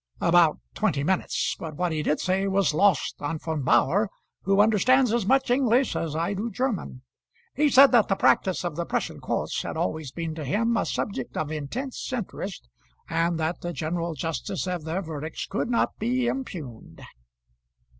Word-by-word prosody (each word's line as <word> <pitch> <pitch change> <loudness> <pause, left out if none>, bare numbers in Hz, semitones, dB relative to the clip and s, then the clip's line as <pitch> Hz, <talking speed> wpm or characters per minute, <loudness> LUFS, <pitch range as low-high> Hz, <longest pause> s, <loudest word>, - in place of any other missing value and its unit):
"About 170 -2 +4 0.2
twenty 165 -10 0
minutes; 185 +4 0
but 160 -2 -6
what 180 +2 -1
he 155 -1 -1
did 150 0 0
say 190 +1 0
was 195 -4 +2
lost 185 -2 +2
on 150 +3 -2
Von 160 -1 -3
Bauhr, 135 - +3 0.3
who 195 +1 +2
understands 225 +4 +4
as 235 -5 0
much 265 0 +3
English 250 0 +2
as 155 -2 -2
I 165 +5 0
do 210 +4 -3
German. 225 - -3 0.5
He 295 +2 +3
said 275 0 +7
that 235 -4 +5
the 195 - +1
practice 185 -1 +2
of 175 - -3
the 170 +1 -2
Prussian - - -2
courts - - -2
had - - -5
always 140 +7 -2
been 165 0 -4
to 155 -1 -6
him 230 - +1
a - - 0
subject 135 - -3
of 155 -1 -2
intense 230 - -5
interest, 205 - -5 0.4
and 165 0 0
that 160 +2 -2
the 175 0 -4
general 165 +2 -3
justice 165 +6 -3
of 180 -4 -3
their 170 +5 -2
verdicts 155 -1 -5
could 215 +4 -2
not 235 - +1
be 245 +3 0
impugned." 175 - -5
180 Hz, 175 wpm, -26 LUFS, 155-225 Hz, 0.5 s, said